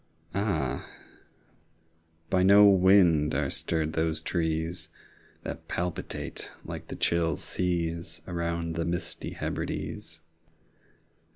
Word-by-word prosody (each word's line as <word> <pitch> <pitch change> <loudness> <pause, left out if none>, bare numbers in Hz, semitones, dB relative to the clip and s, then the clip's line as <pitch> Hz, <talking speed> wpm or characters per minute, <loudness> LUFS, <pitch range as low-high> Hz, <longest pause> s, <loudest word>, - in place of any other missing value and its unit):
Ah, 90 - 0 1.5
by 95 - +4
no 100 +2 +8
wind 95 -5 +5
are - - 0
stirred 80 -1 -1
those 80 0 +1
trees 80 0 -1 0.5
That - - -6
palpitate 90 0 -4 0.2
like - - -6
the - - -6
chill 85 -2 +1
seas 85 -2 -1
15 90 - -7
Around 85 -1 -2
the 85 - 0
misty 85 +1 -3
Hebrides! 80 -6 -4
85 Hz, 100 wpm, -28 LUFS, 80-90 Hz, 1.5 s, no